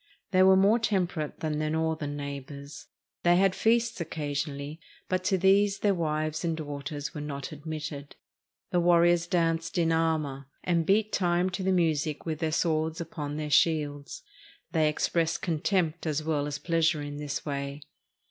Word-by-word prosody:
They 185 -2 +4
were 190 0 +7
more 205 +5 +5
temperate 180 -8 -1
than 155 -1 -1
their 155 0 0
northern 155 -2 -1
neighbors. 140 +1 -7 0.3
They 175 0 +4
had 190 +1 +4
feasts 230 0 +1
occasionally, 145 -1 -4 0.3
but 185 0 -1
to 190 - +2
these 195 +2 +4
their 205 -1 +3
wives 155 -2 -1
and 165 -2 -1
daughters 145 -1 -5
were 150 - -5
not 140 -2 -5
admitted. 150 -1 -6 0.6
The 175 - +3
warriors 175 0 +4
danced 165 -1 0
in 165 -1 +2
armor, 155 -5 0 0.2
and 170 -2 +1
beat 215 +2 +2
time 175 0 +1
to 190 - -4
the 190 0 +1
music 155 -4 0
with 160 -2 -3
their 160 -1 0
swords 160 0 0
upon 150 -3 -5
their 150 -1 -4
shields. 145 -3 +1 0.5
They 155 -3 +3
expressed 165 +2 0
contempt 165 -1 0
as 155 0 -1
well 150 -2 0
as 145 -1 -3
pleasure 165 -2 +1
in 145 0 -6
this 145 -1 -4
way. 140 0 -4
160 Hz, 160 wpm, -28 LUFS, 150-175 Hz, 0.6 s, were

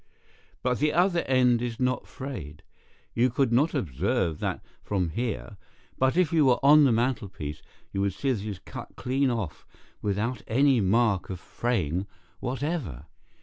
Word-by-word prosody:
But 125 -1 +1
the 150 0 +2
other 175 +1 +3
end 125 -2 +4
is 120 -2 -3
not 125 -1 0
frayed. 95 - -7 0.5
You 120 +2 +3
could 130 0 +1
not 150 +7 +3
observe 90 - 0
that - - -3 0.2
from 95 -4 -1
here, 110 +1 -4 0.4
but 130 +5 +2
if 180 -3 +3
you 160 -2 +5
were 125 - +5
on 150 +1 +8
the 130 - +4
mantelpiece 105 - -2 0.3
you 100 - -1
would 100 -1 +1
see 135 +7 -1
that 115 -6 -1
it 110 - -4
is 100 - -5
cut - - -9
clean 130 +2 +1
off 115 -9 -3 0.4
without 105 +4 -1
any 130 +1 +4
mark 100 0 +2
of 95 -2 -5
fraying 95 -5 -1 0.3
whatever. 130 - -3
120 Hz, 160 wpm, -27 LUFS, 100-135 Hz, 0.5 s, on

